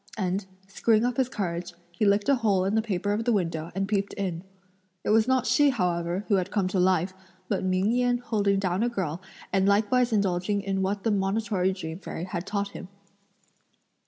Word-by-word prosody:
and 190 0 -1 0.2
screwing 220 +3 +2
up 245 -1 -1
his 260 -2 +1
courage, 175 -5 -4 0.2
he 175 +5 -1
licked 200 +2 +3
a 280 -1 +4
hole 200 -5 +2
in 195 - 0
the 220 - +3
paper 205 -2 -1
of 215 +2 -1
the 240 - +1
window 165 -6 -1
and 195 0 -1
peeped 200 -1 -1
in. 180 -4 -3 0.6
It - - 0
was 220 +1 +4
not 260 -2 +2
she, 290 +2 +4
however, 180 -4 -1
who 205 - +3
had 185 - -1
come 195 -3 0
to 190 - 0
life, 185 0 +2 0.3
but 195 -2 -1
Ming 185 +3 +1
Yen 245 0 +2
holding 205 -4 0
down 185 0 0
a 240 - +2
girl 180 -7 -3 0.3
and 195 0 +3
likewise 230 +5 +3
indulging 200 -1 0
in 195 -1 -1
what 195 +1 -1
the 225 - +1
Monitory 195 -1 0
Dream 165 -3 -6
Fairy 170 - -6
had 180 0 -5
taught 200 0 -1
him. 190 - -9
200 Hz, 200 wpm, -27 LUFS, 185-220 Hz, 0.6 s, a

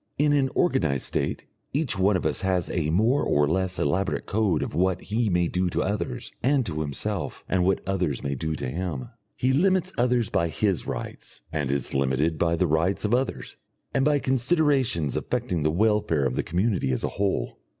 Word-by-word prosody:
In 145 +1 +3
an 135 -2 +2
organised 80 - +1
state - - -2 0.3
each 145 -2 0
one 95 +1 +4
of 90 - -5
us 80 +3 0
has 95 -3 0
a 80 -4 0
more 110 - +3
or 75 0 +2
less 95 +3 0
elaborate 95 +7 0
code 100 -6 +1
of - - -5
what 90 +3 +1
he 110 +1 -1
may 90 -2 +2
do 90 +1 0
to - - 0
others 100 - -3
and 135 0 +2
to 80 -4 -3
himself, 70 -3 -3
and 95 -1 +1
what 95 0 0
others 90 -8 -1
may 70 - -1
do 80 +3 -2
to 65 - -4
him. 80 - -4 0.3
He 130 +1 +1
limits 185 +4 +2
others 120 -3 +2
by 85 - +2
his 95 +3 0
rights, - - -6
and 75 -4 -1
is 70 -2 -1
limited 70 +4 +1
by 85 0 +2
the 90 - +1
rights 85 +6 +1
of 105 - +1
others, 130 +2 -1 0.4
and 135 - +2
by 150 +1 +3
considerations 130 - +1
affecting 85 -3 -1
the 75 - +2
welfare 95 -5 +2
of 65 - 0
the - - +1
community 90 - 0
as 65 - -1
a - - +1
whole. 95 -12 -1
95 Hz, 195 wpm, -26 LUFS, 80-120 Hz, 0.4 s, one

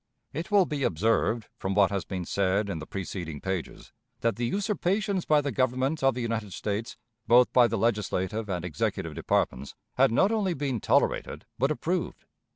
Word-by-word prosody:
It 165 +5 -4
will 200 -3 +5
be 150 -3 -4
observed, 110 +3 +1
from 95 0 -2
what 100 -1 +4
has 100 -2 -2
been 90 -2 -4
said 100 +2 0
in 80 - -4
the 75 - -8
preceding 85 -5 -5
pages, 95 -3 -5 0.3
that 115 0 +1
the 120 0 -1
usurpations 200 - 0
by 150 -1 +4
the 140 -1 -2
Government 130 +4 0
of 135 -2 +4
the 125 - -3
United 110 -4 -3
States, 105 +2 -3 0.3
both 125 +1 +5
by 125 -2 +6
the 115 0 -2
legislative 105 -1 -1
and 90 -2 -2
executive 80 -5 -2
departments, 65 +2 -1 0.2
had - - +5
not 190 - +3
only 200 -6 0
been 135 -4 -2
tolerated - - +1
but 135 +3 +3
approved. 170 +3 -2
115 Hz, 175 wpm, -27 LUFS, 100-145 Hz, 0.3 s, by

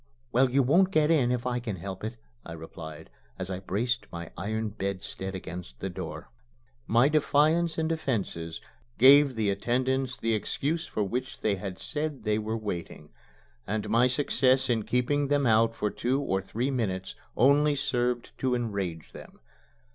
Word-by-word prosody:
"Well, 130 +2 +4
you 135 +2 +3
won't 175 +9 +4
get 155 -4 +3
in 130 -7 +3
if 125 -1 -1
I 125 -1 0
can 115 -5 -4
help 95 +2 -7
it," 110 +2 -4 0.3
I 85 - -8
replied, 80 -1 -9 0.3
as 95 +1 -4
I 90 - -3
braced 105 +4 -1
my 85 -1 -7
iron 110 +4 -2
bedstead 95 -1 -4
against 90 -9 -8
the - - -4
door. - - -7 0.6
My 120 +4 +5
defiance 155 +2 +2
and 160 -1 +1
defences 110 - -2 0.4
gave 140 +1 +7
the 110 -3 +1
attendants 130 +5 0
the 115 0 0
excuse 150 +9 -1
for 105 - -1
which 130 +6 -4
they 100 -2 +1
had 95 0 -6
said 150 -4 -3
they 105 0 +1
were 110 +1 -2
waiting; 85 -7 -6 0.6
and 105 +1 -2
my 120 +2 +5
success 130 -1 +2
in 110 -3 0
keeping 140 +4 +1
them 145 0 +2
out 115 0 +4
for 105 -2 -1
two 130 +3 0
or 95 -9 0
three 120 +7 -2
minutes 95 -7 -2 0.2
only 145 +4 +5
served 125 -3 -1
to 130 -1 +1
enrage 100 -9 -3
them. - - -12
120 Hz, 165 wpm, -28 LUFS, 100-135 Hz, 0.6 s, gave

